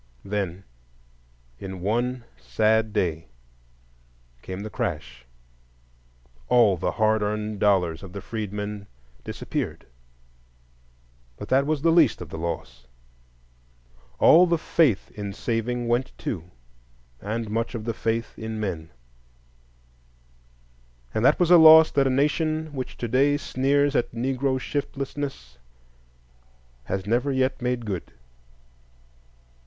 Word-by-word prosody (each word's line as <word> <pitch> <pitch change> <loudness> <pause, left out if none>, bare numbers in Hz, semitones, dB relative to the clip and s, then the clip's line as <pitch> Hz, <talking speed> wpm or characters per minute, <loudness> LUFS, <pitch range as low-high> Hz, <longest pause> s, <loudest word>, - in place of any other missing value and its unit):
Then 95 -2 -3 1.0
in 95 -1 -7
one 120 +5 -1
sad 105 - +1
day 80 -7 -1 1.1
came 95 +6 -6
the 110 - -6
crash,—all - - -3
the 85 - -2
hard 110 -1 +2
earned 105 0 -2
dollars 90 -5 +2
of 95 -2 -10
the 100 - -6
freedmen 105 -1 -5 0.4
disappeared; - - -4 1.5
but - - -8
that 135 +2 +3
was 155 -2 -1
the 165 - +4
least 160 -7 +4
of 90 - -8
the - - -7
loss,—all - - -1
the 170 0 +2
faith 155 - +1
in 100 -2 -6
saving 120 +2 -2
went 120 +2 -1
too, 90 -5 -5 0.7
and 110 +1 -4
much 115 +3 -2
of 110 -2 -5
the 115 - -1
faith 115 +1 -2
in 110 0 -5
men; 85 -6 -4 2.2
and 110 - -1
that - - +4
was 175 -1 +2
a 175 - +10
loss 160 0 +9
that 140 -2 +2
a - - +2
Nation 155 +3 0
which 130 -2 -6
to 120 - -3
day 140 +5 +3
sneers 140 +1 +1
at 120 - +1
Negro 130 +2 -1
shiftlessness 135 - -5 1.3
has 95 -1 -3
never 120 +6 +1
yet 130 0 0
made 125 -1 -2
good. 95 -5 -5
110 Hz, 115 wpm, -25 LUFS, 80-130 Hz, 2.2 s, a